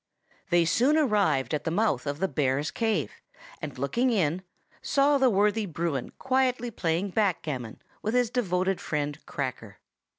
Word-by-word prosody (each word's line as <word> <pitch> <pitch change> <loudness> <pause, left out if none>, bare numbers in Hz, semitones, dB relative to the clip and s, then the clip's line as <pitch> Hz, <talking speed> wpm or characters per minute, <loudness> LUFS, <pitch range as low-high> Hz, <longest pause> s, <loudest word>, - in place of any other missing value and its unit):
They 175 -1 +4
soon 250 - +3
arrived 205 - +2
at 150 - -1
the - - -1
mouth 165 - 0
of 145 0 -2
the 190 +4 0
bear's 145 -2 0
cave, 215 - 0 0.5
and - - -6
looking 235 - +1
in, 180 -6 +1 0.4
saw 280 0 +3
the 265 -1 +5
worthy 210 0 +2
Bruin 160 -5 -2
quietly 255 -2 0
playing 175 0 -1
backgammon 155 - -2 0.2
with 215 +3 -1
his 245 -2 +2
devoted 190 -5 0
friend 145 -1 -3
Cracker. 120 -7 -5
185 Hz, 145 wpm, -27 LUFS, 150-230 Hz, 0.5 s, the